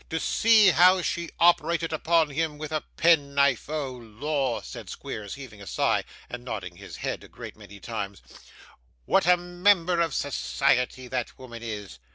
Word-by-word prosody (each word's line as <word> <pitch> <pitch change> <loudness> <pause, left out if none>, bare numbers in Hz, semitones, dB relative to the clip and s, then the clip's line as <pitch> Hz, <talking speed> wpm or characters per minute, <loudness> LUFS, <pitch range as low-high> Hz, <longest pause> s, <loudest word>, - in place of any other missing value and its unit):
To 160 - -2
see 220 0 +5
how 180 +2 +5
she 170 0 -2
operated 170 -1 +3
upon 160 -1 +2
him 155 +1 -2
with 155 0 -6
a 155 -1 -1 0.2
pen 160 -5 +3
knife! 140 -2 +2
Oh 150 -4 -2
Lor!' 125 +3 -3
said - - -9
Squeers, 105 -2 -6
heaving 120 -7 -11
a 100 - -10
sigh, - - +1 0.2
and - - -7
nodding - - -6
his - - -10
head - - -4
a - - -12
great - - -10
many 100 -1 -13
times, 100 -4 -6 0.8
'what 160 - +2
a 180 0 +6
member 175 0 +2
of 165 -2 0
society 130 -2 0
that 125 -2 -3
woman 120 -3 -10
is! 105 - -7
145 Hz, 170 wpm, -26 LUFS, 120-170 Hz, 0.8 s, a